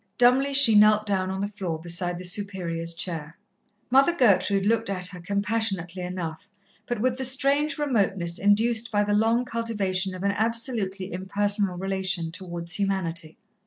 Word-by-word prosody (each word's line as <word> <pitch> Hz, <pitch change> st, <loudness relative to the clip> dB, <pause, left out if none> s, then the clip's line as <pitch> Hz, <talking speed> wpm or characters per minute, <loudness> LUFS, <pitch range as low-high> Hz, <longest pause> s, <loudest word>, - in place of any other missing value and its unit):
Dumbly 255 Hz, +3 st, +4 dB
she 270 Hz, -5 st, +7 dB
knelt 215 Hz, 0 st, +5 dB
down 190 Hz, -2 st, -1 dB
on 190 Hz, 0 st, -3 dB
the 200 Hz, -, -1 dB
floor 190 Hz, -6 st, -5 dB
beside 175 Hz, +1 st, -2 dB
the 180 Hz, -, -8 dB
Superior's 180 Hz, -4 st, -3 dB
chair. 165 Hz, -2 st, -5 dB, 0.5 s
Mother 275 Hz, +6 st, +4 dB
Gertrude 200 Hz, -, +3 dB
looked 225 Hz, 0 st, +1 dB
at 185 Hz, -2 st, -2 dB
her 180 Hz, 0 st, -2 dB
compassionately 200 Hz, -2 st, -2 dB
enough, 180 Hz, 0 st, -6 dB, 0.4 s
but 240 Hz, -, -2 dB
with 255 Hz, +2 st, 0 dB
the -, -, -2 dB
strange 275 Hz, +3 st, +1 dB
remoteness 195 Hz, -, 0 dB
induced 220 Hz, +3 st, +2 dB
by 205 Hz, -1 st, +2 dB
the 205 Hz, 0 st, -1 dB
long 225 Hz, +3 st, +2 dB
cultivation 200 Hz, -6 st, -2 dB
of 185 Hz, -, -7 dB
an 200 Hz, -, +2 dB
absolutely 215 Hz, -4 st, -1 dB
impersonal 200 Hz, 0 st, 0 dB
relation 190 Hz, -3 st, -1 dB
towards 170 Hz, 0 st, -7 dB
humanity. 170 Hz, -5 st, -3 dB
200 Hz, 155 wpm, -25 LUFS, 180-225 Hz, 0.5 s, she